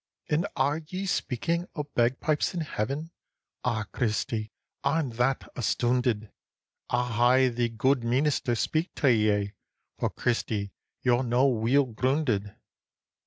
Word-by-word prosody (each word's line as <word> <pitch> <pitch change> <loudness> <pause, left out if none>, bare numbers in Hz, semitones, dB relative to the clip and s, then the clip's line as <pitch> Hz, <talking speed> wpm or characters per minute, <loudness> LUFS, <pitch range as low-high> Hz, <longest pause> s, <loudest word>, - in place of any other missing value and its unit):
"And 165 +6 +2
are 145 +3 +1
ye 190 +1 -3
speaking 170 +1 -1
o' 150 - -2
bagpipes 140 +5 0
in 170 - -1
Heaven? 145 +3 -3 0.5
Ah, 115 -3 0
Christy, 110 -2 -1 0.3
I'm 140 -1 +1
that 125 +3 0
astoonded 120 -1 0 0.6
I'll 120 -1 +2
hae 130 -1 +4
the 120 0 0
guid 125 +3 +1
meenister 130 +1 +1
speak 160 +8 -1
tae 135 -5 +4
ye, 105 -2 +1 0.5
For, - - +1
Christy, 105 -4 -1 0.3
ye're 125 -1 +3
no 125 +1 +2
weel 125 +3 +3
groonded." 125 -4 0
125 Hz, 120 wpm, -28 LUFS, 115-140 Hz, 0.6 s, hae